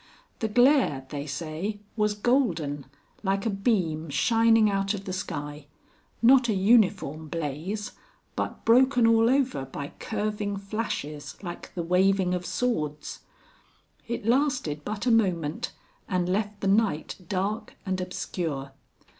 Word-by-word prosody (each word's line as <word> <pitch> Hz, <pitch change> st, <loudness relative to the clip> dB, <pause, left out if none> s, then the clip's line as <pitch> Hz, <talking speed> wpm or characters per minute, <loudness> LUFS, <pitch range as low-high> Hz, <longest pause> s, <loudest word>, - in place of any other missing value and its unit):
The 220 Hz, -, 0 dB
glare, 245 Hz, -, +3 dB
they 145 Hz, 0 st, -4 dB
say, 160 Hz, +8 st, -4 dB, 0.2 s
was 210 Hz, -2 st, +1 dB
golden 175 Hz, -, 0 dB, 0.3 s
like 195 Hz, 0 st, 0 dB
a 225 Hz, -, +1 dB
beam 180 Hz, -7 st, 0 dB
shining 225 Hz, -, +4 dB
out 195 Hz, 0 st, 0 dB
of 195 Hz, -1 st, -8 dB
the 185 Hz, -, -4 dB
sky, 150 Hz, -5 st, -5 dB, 0.6 s
not 250 Hz, 0 st, +6 dB
a 215 Hz, -, +2 dB
uniform 190 Hz, -, +3 dB
blaze, 165 Hz, +7 st, -4 dB, 0.4 s
but -, -, -4 dB
broken 250 Hz, +1 st, +5 dB
all 225 Hz, 0 st, +5 dB
over 260 Hz, -, +1 dB
by 140 Hz, +2 st, -6 dB
curving 210 Hz, -1 st, -2 dB
flashes 195 Hz, -9 st, -4 dB
like 175 Hz, -2 st, -7 dB
the 175 Hz, -, -2 dB
waving 185 Hz, +1 st, +3 dB
of 180 Hz, 0 st, -3 dB
swords. 150 Hz, -12 st, -2 dB, 0.9 s
It 235 Hz, -3 st, -4 dB
lasted 245 Hz, -, +1 dB
but 210 Hz, +4 st, -4 dB
a 245 Hz, -, +3 dB
moment 175 Hz, -9 st, +1 dB, 0.4 s
and 180 Hz, -2 st, 0 dB
left 205 Hz, +2 st, -1 dB
the 195 Hz, -, 0 dB
night 200 Hz, -6 st, +1 dB
dark 200 Hz, +3 st, -2 dB
and 185 Hz, -1 st, -1 dB
obscure. 160 Hz, -6 st, -4 dB
195 Hz, 130 wpm, -27 LUFS, 160-225 Hz, 0.9 s, not